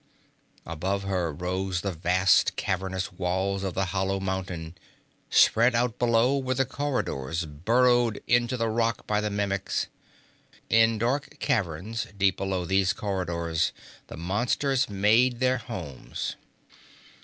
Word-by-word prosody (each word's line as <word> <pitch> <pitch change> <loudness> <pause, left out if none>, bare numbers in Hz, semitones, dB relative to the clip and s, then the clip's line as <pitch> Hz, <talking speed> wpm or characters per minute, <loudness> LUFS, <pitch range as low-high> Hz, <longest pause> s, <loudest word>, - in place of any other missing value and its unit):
Above 95 +5 -2
her 90 -4 -1
rose 90 +3 -2
the 100 - -2
vast, 90 +2 +3
cavernous 95 +1 -2
walls 95 +2 -1
of 95 -2 -3
the 95 - +1
hollow 95 0 0
mountain. 95 -4 -4 0.6
Spread 120 +2 +5
out 120 0 0
below 120 +3 +3
were 130 -1 -1
the 135 +1 +2
corridors 85 - -2
burrowed 115 +9 +2
into 120 +1 +2
the 115 -1 0
rock 115 +1 0
by 105 0 0
the 105 - -1
Mimics. 100 -2 -1 0.9
In 115 0 +5
dark 125 +6 -1
caverns 105 +2 -1
deep 95 -1 +2
below 95 -2 -2
these 95 +3 +2
corridors 85 -5 -1 0.3
the - - -9
monsters 120 - 0
made 110 +5 +3
their 130 -1 +2
homes. 90 - -6
100 Hz, 125 wpm, -27 LUFS, 90-115 Hz, 0.9 s, Spread